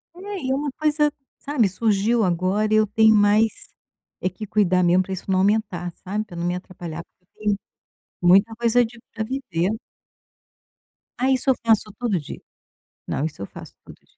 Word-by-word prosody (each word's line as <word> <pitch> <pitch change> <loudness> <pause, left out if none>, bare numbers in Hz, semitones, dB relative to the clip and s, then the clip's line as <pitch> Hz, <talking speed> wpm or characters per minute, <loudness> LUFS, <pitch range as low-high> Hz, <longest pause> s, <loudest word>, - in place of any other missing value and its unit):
É, 395 +2 -6
e 260 0 0
uma 285 +1 -1
coisa, 300 -1 +2 0.3
sabe, 270 -8 +1
surgiu 215 +3 +1
agora 185 +4 +1
e - - +6
eu 215 0 +3
tenho 220 +1 +5
mais 210 +2 +2 0.5
é 185 - +1
que 200 +4 -8
cuidar 185 -3 +2
mesmo 180 +2 +4
para 190 - -5
isso 190 - -7
não 185 - +3
aumentar, 190 -3 0
sabe. 210 +3 -2
Pra 190 -5 -12
não 170 0 -3
me 175 0 0
atrapalhar, 175 -3 -7
porque 180 - -45 0.2
eu - - -13
tenho - - -3 0.6
muita 195 +6 +5
coisa 235 +1 +3
de 235 +1 -11 0.2
pra 220 -1 -2
viver. 210 -8 -2 1.5
Ah, 260 - +3
isso 265 0 +1
eu 260 - +5
faço 220 -2 +3
todo 235 -6 0
dia. 145 - -9 0.7
Não, - - -2
isso 155 -1 -4
eu - - -3
faço - - -12
todo - - -12
dia. - - -33
210 Hz, 185 wpm, -23 LUFS, 185-235 Hz, 1.5 s, e